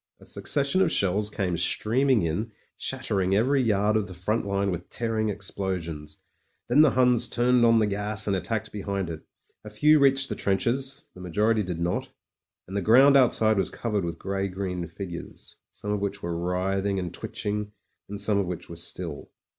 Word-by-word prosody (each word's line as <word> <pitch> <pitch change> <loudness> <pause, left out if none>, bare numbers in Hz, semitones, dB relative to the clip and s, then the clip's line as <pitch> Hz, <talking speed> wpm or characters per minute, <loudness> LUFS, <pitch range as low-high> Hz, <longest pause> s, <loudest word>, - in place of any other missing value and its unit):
A - - -16
succession 140 +5 +1
of 175 -4 +3
shells 100 - +2
came 95 -4 -2
streaming 120 +6 +2
in, 105 +8 -2 0.2
shattering 95 0 -1
every 130 +6 +2
yard 105 -2 +2
of 105 -2 0
the 95 - -10
front 105 +6 -1
line 100 0 0
with 90 0 -6
tearing 110 -2 -1
explosions. 90 -6 -5 0.4
Then 130 +5 +5
the 155 - +6
Huns 125 -2 +3
turned 120 0 +2
on 115 -1 +5
the 110 - +3
gas 105 +1 +1
and 100 - +1
attacked 110 +3 -3
behind 100 -3 -3
it. 80 -1 -7 0.4
A 105 - -8
few 150 +9 +4
reached 135 -1 +3
the - - -2
trenches 130 +8 -1
— - - -47
^the 90 - -11
majority 105 +5 +1
did 90 -4 -4
not; 85 +1 -2 0.6
and 95 - -7
the 100 - 0
ground 130 +8 +6
out 130 -3 +6
side 110 -1 +2
was 95 - +1
covered 105 -5 -2
with 85 -1 -4
grey 100 +1 -2
green 90 -2 -4
figures, 90 -3 -8
some 105 - -6
of 105 - 0
which 100 0 -4
were 85 0 -3
writhing 95 +3 -1
and 90 -2 -4
twitching 105 0 -4 0.4
and 100 - -5
scmie 100 0 +2
of 95 - -1
which 90 -1 -6
were 85 - -8
still. 85 -2 -5
100 Hz, 190 wpm, -26 LUFS, 90-115 Hz, 0.6 s, the